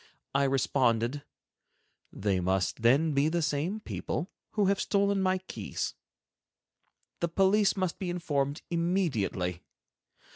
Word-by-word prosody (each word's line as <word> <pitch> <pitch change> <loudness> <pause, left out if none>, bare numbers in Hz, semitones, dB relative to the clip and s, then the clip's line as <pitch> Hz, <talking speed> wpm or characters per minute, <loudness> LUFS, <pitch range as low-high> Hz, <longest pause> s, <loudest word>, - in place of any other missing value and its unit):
I 140 0 +3
responded: 130 -1 +1 0.9
"They 100 -2 0
must 95 +3 0
then 140 +7 +4
be 140 +2 +3
the 170 0 0
same 155 +9 -1
people 180 -3 -4 0.2
who 210 -2 +2
have 195 0 +2
stolen 200 -1 +2
my 185 0 +2
keys. 185 - -4 1.3
The 170 - +1
police 195 +4 +3
must 185 -3 -1
be 185 - -3
informed 145 -5 -1
immediately. 145 - 0
160 Hz, 115 wpm, -29 LUFS, 130-185 Hz, 1.3 s, then